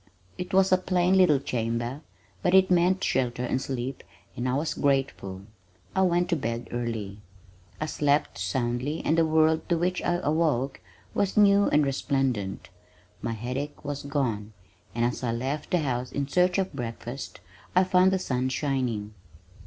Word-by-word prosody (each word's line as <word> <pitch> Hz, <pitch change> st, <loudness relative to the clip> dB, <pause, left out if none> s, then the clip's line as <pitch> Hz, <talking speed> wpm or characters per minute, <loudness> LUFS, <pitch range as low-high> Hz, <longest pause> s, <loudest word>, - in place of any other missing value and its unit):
It 180 Hz, -, -6 dB
was 190 Hz, 0 st, +4 dB
a 185 Hz, -, +5 dB
plain 185 Hz, 0 st, +2 dB
little 180 Hz, -6 st, +5 dB
chamber, 120 Hz, +2 st, -2 dB, 0.4 s
but 180 Hz, 0 st, +3 dB
it 190 Hz, 0 st, +5 dB
meant 180 Hz, +2 st, +3 dB
shelter 125 Hz, -1 st, 0 dB
and 130 Hz, +1 st, -1 dB
sleep 130 Hz, 0 st, -4 dB, 0.3 s
and 125 Hz, +1 st, -2 dB
I 125 Hz, -, +1 dB
was 155 Hz, +3 st, -1 dB
grateful. 135 Hz, -9 st, -1 dB, 0.5 s
I 190 Hz, -, +3 dB
went 175 Hz, -1 st, +2 dB
to 170 Hz, -, +2 dB
bed 115 Hz, -5 st, -3 dB
early. 115 Hz, -4 st, -4 dB, 0.6 s
I -, -, -1 dB
slept 145 Hz, -6 st, 0 dB
soundly 120 Hz, -, -1 dB
and 160 Hz, -, +3 dB
the 165 Hz, -1 st, +3 dB
world 160 Hz, 0 st, +2 dB
to 170 Hz, -, +3 dB
which 180 Hz, +2 st, 0 dB
I 175 Hz, -, +1 dB
awoke 145 Hz, -4 st, +1 dB, 0.3 s
was 200 Hz, 0 st, 0 dB
new 200 Hz, -1 st, +6 dB
and 150 Hz, 0 st, +3 dB
resplendent. 135 Hz, -7 st, -1 dB, 0.5 s
My 115 Hz, -, -2 dB
headache 130 Hz, +7 st, -5 dB
was 145 Hz, 0 st, -3 dB
gone, 115 Hz, -8 st, -2 dB, 0.4 s
and 120 Hz, 0 st, +2 dB
as 120 Hz, -, -2 dB
I 115 Hz, -2 st, 0 dB
left 135 Hz, +5 st, -3 dB
the 180 Hz, -, +2 dB
house 125 Hz, -3 st, -2 dB
in 140 Hz, -1 st, -2 dB
search 180 Hz, +5 st, +2 dB
of 190 Hz, -3 st, -1 dB
breakfast 120 Hz, 0 st, -6 dB, 0.4 s
I 185 Hz, -, +6 dB
found 185 Hz, 0 st, +4 dB
the 190 Hz, -, +2 dB
sun 130 Hz, -7 st, -1 dB
shining. 125 Hz, -7 st, -2 dB
140 Hz, 165 wpm, -27 LUFS, 120-175 Hz, 0.6 s, new